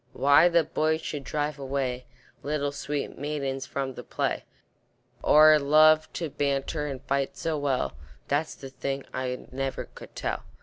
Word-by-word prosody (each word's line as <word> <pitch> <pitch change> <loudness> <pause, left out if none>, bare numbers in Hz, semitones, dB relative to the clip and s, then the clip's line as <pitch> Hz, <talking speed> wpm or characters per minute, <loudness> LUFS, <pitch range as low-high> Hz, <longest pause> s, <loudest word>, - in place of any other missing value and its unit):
Why 145 +5 +6
the 170 -1 +4
boys 155 +1 0
should 145 -3 -5
drive 150 +1 -2
away 130 -2 -2 0.4
Little 145 -1 -1
sweet 145 0 -4
maidens 135 -2 -3
from 135 -1 -3
the - - -8
play, - - -2 0.8
Or 155 0 +7
love 155 +2 +5
to 165 -4 -4
banter 140 +2 -1
and 135 -2 -6
fight 140 0 -1
so 165 -1 -1
well, 135 - 0 0.3
That's 145 +3 0
the 135 -1 -10
thing 135 +1 -4
I 125 -1 -3
never 135 +1 -3
could - - -12
tell. - - -3
140 Hz, 150 wpm, -27 LUFS, 135-150 Hz, 0.8 s, Or